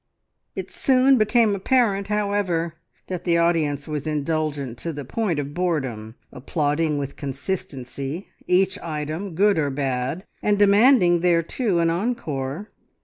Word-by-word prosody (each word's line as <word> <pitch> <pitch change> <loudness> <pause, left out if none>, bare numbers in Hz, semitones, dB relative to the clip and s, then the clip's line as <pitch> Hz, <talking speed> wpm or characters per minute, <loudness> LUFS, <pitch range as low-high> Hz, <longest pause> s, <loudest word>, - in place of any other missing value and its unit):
It - - -6
soon 260 -1 +4
became 215 0 +3
apparent, 200 -1 +1
however, 200 -5 0 0.3
that 180 -2 -5
the 170 -2 +2
audience 160 -4 +1
was 150 -1 -4
indulgent 150 -4 -2
to 170 - -3
the 145 -3 -7
point 185 - -1
of 145 0 -4
boredom, 135 -11 -2 0.2
applauding 150 +3 -1
with 140 -1 -4
consistency 140 +1 -5 0.2
each 190 +2 +2
item, 160 +3 -4
good 200 0 +3
or 145 -2 +1
bad, 135 +5 -2 0.2
and 210 -1 +2
demanding 205 -3 +5
thereto 175 +4 +1
an 165 -1 +2
encore. 170 - -3
165 Hz, 130 wpm, -23 LUFS, 145-200 Hz, 0.3 s, demanding